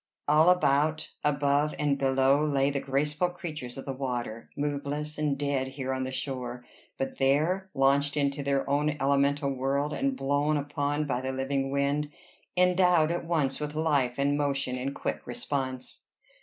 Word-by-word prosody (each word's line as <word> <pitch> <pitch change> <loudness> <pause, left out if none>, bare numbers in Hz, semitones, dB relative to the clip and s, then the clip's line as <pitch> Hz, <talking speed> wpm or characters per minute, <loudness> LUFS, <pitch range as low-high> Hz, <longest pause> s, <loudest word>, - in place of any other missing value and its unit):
All 155 +3 +5
about, 155 -3 +2
above, 145 0 +2
and 145 -1 +1
below, 135 +1 +3
lay 140 -2 +2
the 140 - -1
graceful 150 +6 0
creatures 155 -8 -7
of 135 - -7
the 135 - -3
water, 120 -4 -4
moveless 145 +1 -2
and 150 -2 0
dead 140 -2 -1
here 130 -1 -4
on 130 0 -2
the 130 - -4
shore, 125 -2 -4 0.3
but 135 - -4
there 155 +8 +2
launched 140 +2 +3
into 140 0 0
their 140 -1 0
own 145 +1 +1
elemental 140 +1 +2
world, 140 +3 -1
and 275 0 0
blown 145 +2 +1
upon 145 +1 -1
by 125 -3 -1
the 130 0 -2
living 135 +1 -1
wind 140 +2 0 0.5
endowed 180 -3 +4
at 170 0 -2
once 155 -5 0
with 150 0 -4
life 145 -6 +1
and 140 +1 +2
motion 140 -3 0
and 135 +2 -3
quick - - -4
response. 135 - -4
140 Hz, 160 wpm, -28 LUFS, 135-150 Hz, 0.5 s, All